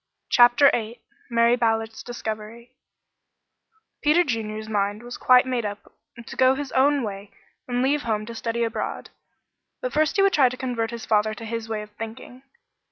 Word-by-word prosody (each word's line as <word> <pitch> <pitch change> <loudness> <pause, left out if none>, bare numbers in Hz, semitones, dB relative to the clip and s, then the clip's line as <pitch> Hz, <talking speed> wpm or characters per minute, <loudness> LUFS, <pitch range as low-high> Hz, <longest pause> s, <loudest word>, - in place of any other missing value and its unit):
CHAPTER 245 +3 +6
VIII 230 -1 -3 0.3
MARY 235 0 +4
BALLARD'S 225 -1 -1
DISCOVERY 230 0 -7 1.3
Peter 305 +4 +4
Junior's 220 -5 -4
mind 205 +1 -1
was 240 0 -7
quite 250 0 +5
made 250 -2 -1
up 205 -1 -7 0.3
to - - -9
go 260 0 +4
his 280 -1 -5
own 280 +1 +3
way 200 -1 -6 0.4
and 245 0 0
leave 285 +2 +1
home 215 -3 -2
to 235 - -8
study 230 +1 -2
abroad, 225 -2 -4 0.7
but - - -4
first 305 -1 +2
he 390 - +4
would 395 - +3
try 265 -4 +5
to 255 - -7
convert 240 -3 -2
his 235 -1 -7
father 215 0 +1
to 230 - -9
his 225 0 -5
way 215 -1 -3
of 210 - -14
thinking. 225 +3 -8
235 Hz, 170 wpm, -24 LUFS, 220-255 Hz, 1.3 s, CHAPTER